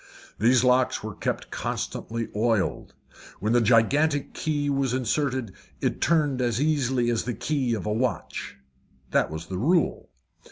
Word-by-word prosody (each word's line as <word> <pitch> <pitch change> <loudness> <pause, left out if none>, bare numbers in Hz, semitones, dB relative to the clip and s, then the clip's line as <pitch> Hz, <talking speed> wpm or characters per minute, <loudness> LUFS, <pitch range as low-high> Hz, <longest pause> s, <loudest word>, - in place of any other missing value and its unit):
These 120 +3 +4
locks 125 0 +2
were - - -5
kept - - -3
constantly 115 0 -3
oiled. 110 -2 0 0.4
When 110 +2 0
the 120 - +4
gigantic 140 +6 +3
key 145 -2 -1
was 135 -3 +1
inserted, 130 -3 -1 0.3
it - - -1
turned 150 -6 +2
as 120 -2 0
easily 130 -5 +1
as 115 -2 -1
the 120 -2 -2
key 130 -1 0
of 105 - -5
a 105 - 0
watch 125 +3 -3 0.5
that - - +2
was 80 +1 -6
the 95 -1 -5
rule. 165 - +1
125 Hz, 150 wpm, -26 LUFS, 115-140 Hz, 0.5 s, These